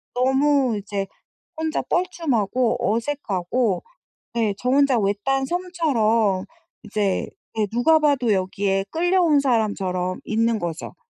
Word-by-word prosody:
너무 265 -1 +2
이제 200 -1 -4 0.5
혼자 320 0 -1
뻘쭘하고 255 - 0 0.2
어색하고 230 -4 -1 0.5
네. 225 -3 +1
저 250 +4 -2
혼자 275 -2 +4
외딴 210 +7 0
섬처럼 240 - +1 0.4
이제 205 -2 -1 0.3
네 215 -1 +1
누가 280 +8 +4
봐도 275 -7 +2
여기에 195 +1 0
끌려온 345 -2 +3
사람처럼 195 -8 0
있는 230 +1 +1
거죠. 170 -3 -5
235 Hz, 240 characters per minute, -22 LUFS, 200-285 Hz, 0.5 s, 혼자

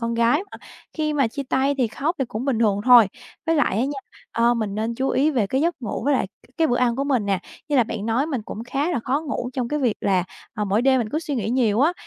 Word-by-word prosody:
con 230 0 -1
gái 235 +6 +3
mà, - - -9 0.4
khi 305 -1 -1
mà 275 -4 +2
chia 280 +5 -5
tay 275 +2 +2
thì 250 - +3
khóc 295 +9 -2
thì 265 - +1
cũng 225 +1 -5
bình 270 -5 0
thường 205 -3 +2
thôi. 245 -4 +8 0.4
Với 330 - +3
lại 290 - +2
á 240 - +2
nha, 280 +1 -3 0.3
ờ, 235 +1 +3
mình 215 -4 -2
nên 220 +2 -2
chú 265 +3 -1
ý 295 +4 +2
về 235 -8 +1
cái 265 +7 0
giấc 335 +3 +1
ngủ 225 - -3
với 285 - +3
lại 255 - +1 0.3
cái 325 - +3
bữa 245 - +1
ăn 240 -2 +1
của 275 - -1
mình 255 -7 0
nè. 195 -2 +1 0.3
Như 290 - +1
là 245 - +5
bạn 215 -1 -5
nói 240 +6 +1
mình 265 -8 -3
cũng 215 +2 -7
khá 275 +7 -1
là 325 - -1
khó 275 +4 +1
ngủ 280 -5 -4
trong 245 -2 -2
cái 300 - -1
việc 245 -7 +1
là, 185 -3 +1 0.3
ờ, 210 - -1
mỗi 205 +3 +1
đêm 265 0 +4
mình 230 -3 -1
cứ 305 - -1
suy 315 -3 -4
nghĩ 220 -4 -2
nhiều 235 -3 +2
á, 315 +5 +4
250 Hz, 290 wpm, -23 LUFS, 225-280 Hz, 0.4 s, thôi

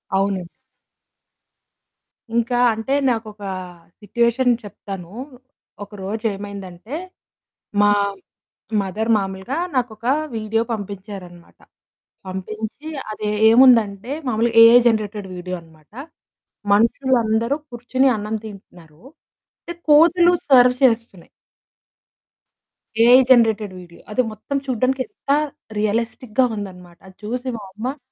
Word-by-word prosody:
అవునండి. 195 -3 0 1.9
ఇంకా 235 +1 +1 0.2
అంటే 225 +5 -3 0.2
నాకొక 220 -3 -4 0.6
సిట్యుయేషన్ 235 +4 +1
చెప్తాను. 195 -3 -9 0.7
ఒకరోజేమైందంటే, 200 - -6 0.9
మా 205 0 +5 0.9
మదర్ 215 +4 -3
మామూలుగా 195 +7 -4 0.2
నాకొక 230 -3 -2 0.3
వీడియో 220 +1 0
పంపించారనమాట. 195 -4 -8 0.7
పంపించి 215 +9 -6 0.2
అది 210 0 -4 0.2
ఏముందంటే 230 -2 +4 0.2
మామూలుగా 230 0 0
ఏఐ 235 +2 +8
జెనరేటెడ్ 210 -3 -1
వీడియో 180 +1 -5
అనమాట. 160 -1 -22 0.8
మనుషులందరూ 230 +1 +2
కూర్చొని 255 +2 0
అన్నం 215 +1 -4
తింటున్నారు. 175 -6 -13 0.6
అంటే 345 - -7 0.2
కోతులు 345 +3 +6 0.2
సర్వ్ 250 -2 +6
చేస్తున్నాయి. 225 -7 0 1.8
ఏఐ 245 +2 +8
జనరేటెడ్ 220 -5 +3
వీడియో 170 -1 -15
అది 255 - +2
మొత్తం 220 +6 -4
చూడానికి 255 +2 0
ఎంత - - -20 0.5
రియలిస్టిక్‌గా 230 +3 0
ఉందన్నమాట 180 -3 -9
అది 185 - -16
చూసి 250 +4 -3
మా 210 - -10
అమ్మ 250 +7 -4
220 Hz, 90 wpm, -21 LUFS, 195-245 Hz, 1.9 s, ఏఐ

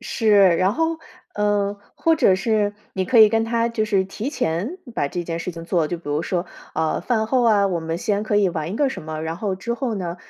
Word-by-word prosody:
是， 225 -4 -1 0.3
然 185 +3 +2
后， 325 +4 -1 0.4
呃， 205 -1 0 0.2
或 330 -1 +2
者 195 -11 +4
是， 205 +1 0 0.2
你 190 - -1
可 230 +6 +3
以 215 -1 +9
跟 225 +1 +1
他 230 0 0
就 230 -2 -1
是 200 -3 +1
提 210 +7 -5
前 250 - -2 0.2
把 145 - 0
这 175 +3 -4
件 165 0 -3
事 170 +2 -4
情 165 -1 -9
做 170 -3 0
就 175 - -3
比 170 - -22
如 145 +2 0
说， 180 0 -2 0.3
呃， 160 0 0
饭 220 -3 0
后 250 +2 +2
啊， 210 -3 +4
我 180 -3 -1
们 165 +1 -3
先 205 -1 -1
可 215 -1 0
以 205 -2 +4
玩 165 0 -4
一 - - -4
个 285 +1 +2
什 265 - -6
么， 155 0 -5
然 160 +1 -4
后 200 0 -2
之 235 +5 -3
后 240 -2 -2
呢， 175 -3 -4
200 Hz, 260 characters per minute, -22 LUFS, 170-225 Hz, 0.4 s, 以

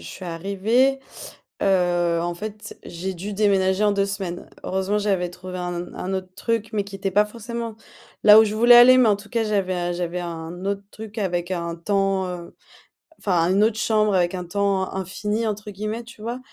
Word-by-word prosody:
suis 85 - -9
arrivée, 200 +10 +1 0.6
heu, 175 -3 +2
en 175 0 -2
fait, 210 +3 -8
j'ai 185 +3 -5
dû 195 +4 -6
déménager 195 -1 +2
en 205 - +4
2 200 0 +1
semaines. 195 -3 -5 0.2
Heureusement, 190 +2 0
j'avais 190 -4 0
trouvé 185 +1 -8
un 175 0 -3
n 175 - -7
un 190 +1 -4
autre 185 -1 -4
truc 225 -2 -1
mais 210 - 0
qui 200 -1 -8
était 195 -1 -3
pas 210 +2 +5
forcément 230 +1 -6 0.5
là 210 +1 +10
où - - +6
je 215 0 -2
voulais 240 +2 +7
aller, 255 +2 +9
mais 245 - +5
en 210 - +5
tout 205 +1 -13
cas, 230 -2 0
j'avais 185 -4 -1
j'avais 175 0 -3
un 170 +1 -6
autre 200 0 -2
truc 220 0 -9
avec 175 -2 -1
un 170 -1 -3
temps, 195 +1 0
heu, 175 -1 -8 0.6
enfin 175 -3 +1
une 200 +3 +4
autre 220 0 +1
chambre 215 -2 +2
avec 175 0 +2
«un 180 - -4
temps 195 +1 0
infini» 210 +4 -2
entre 210 0 -4
guillemets, 215 +4 -4
tu 230 -2 -14
vois? 235 +2 -4
195 Hz, 195 wpm, -23 LUFS, 180-215 Hz, 0.6 s, là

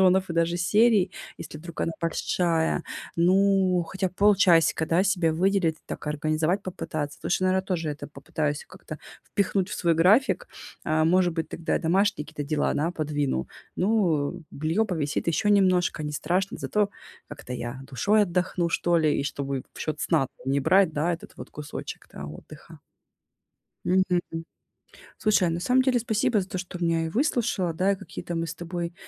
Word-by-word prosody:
сезонов 185 0 +4
и - - -1
даже 170 +1 +1
серий, 205 +1 +3 0.3
если 155 - -8
вдруг 170 +1 -8
она 165 - 0
большая. 165 0 0 0.3
Ну, 185 +1 +3
хотя 190 0 -1
б - - -21
полчасика, 185 -6 +4
да, 165 +3 +3
себе 180 -5 +2
выделить, 175 -1 +1
так - - -7
организовать 155 +5 0
попытаться. 155 -6 -4
Лучше, 185 - 0
наверное, 185 0 +2
тоже 170 -4 -2
это 150 - -6
попытаюсь 150 0 -3
как-то 175 -4 -10 0.3
впихнуть 195 -1 0
в - - -4
свой 170 -3 +2
график. 190 - +4 0.4
Э, 155 0 +2
может 175 +1 +3
быть, 165 -1 -2
тогда 165 - -2
я - - +2
домашние 190 0 +1
какие-то 150 -2 -6
дела, 150 - +1
да, 160 +4 0
подвину. 145 - -2 0.3
Ну, 180 -6 +1
бельё 160 +9 0
повисит 160 -8 -2
ещё 170 +5 +1
немножко, 185 -5 +3
не 150 0 -4
страшно, 180 +6 -1
зато 210 -1 0 0.4
как-то 125 - -8
я 125 +1 -5
душой 205 +12 +2
отдохну, 180 -2 0
что 170 +1 +2
ли, 155 -2 +2
и - - -3
чтобы 140 -2 -3
в - - -13
счёт 155 -1 -3
сна 155 -6 +2
там 135 - -3
не 140 - +2
брать, 180 +4 +4
да, 155 +4 0
этот 170 - -7
вот - - -9
кусочек-то, 150 0 -8
да, - - -5
отдыха. 75 +1 -12 1.1
Мгм. 185 -1 +2 1.0
Слушай, 205 -4 +3
а, - - 0
на 165 +1 -2
самом 255 +7 +3
деле, 255 -2 +2
спасибо 225 0 +1
за 185 - -6
то, - - -5
что 180 0 -6
меня 165 -1 +1
и - - -3
выслушала, 220 - 0
да, 185 +4 +2
и - - -1
какие-то 175 -1 -7
мы 165 0 -1
с 165 - -5
тобой 170 0 -5
175 Hz, 175 wpm, -26 LUFS, 155-190 Hz, 1.1 s, сезонов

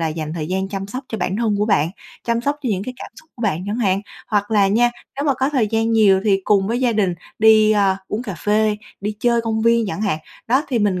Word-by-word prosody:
là 165 - 0
dành 155 0 -4
thời 155 -2 -4
gian 190 +2 -2
chăm 195 -1 -4
sóc 255 +6 -6
cho 220 - -4
bản 185 +2 -1
thân 220 -3 +1
của 210 - +1
bạn, 170 -6 +2 0.3
chăm 235 0 0
sóc 285 +4 -1
cho 250 - -1
những 190 0 -2
cái 255 +3 -6
cảm - - -9
xúc 315 - -28
của 235 - -8
bạn 185 -4 -1
chẳng 210 +3 -2
hạn. 195 -4 +1 0.3
Hoặc 205 -1 0
là 205 -3 +4
nha, 240 +4 +3 0.3
nếu 285 - -2
mà 280 -3 +2
có 265 +2 0
thời 260 -7 +1
gian 225 +1 0
nhiều 200 -4 +5
thì 195 -2 +3
cùng 195 -2 +3
với 240 +3 -1
gia 245 -2 +2
đình 195 -5 +1 0.2
đi, 215 0 +6
ơ, 195 -2 +2
uống 220 +4 -3
cà 200 -7 -5
phê, 210 +3 +1 0.2
đi 210 +1 -3
chơi 235 -1 +2
công 220 -1 -2
viên 230 -1 +3
chẳng 200 - -4
hạn. 195 -7 0 0.3
Đó, 260 +6 +2
thì 245 -4 0
mình 200 -3 +1
215 Hz, 275 wpm, -20 LUFS, 195-235 Hz, 0.3 s, đi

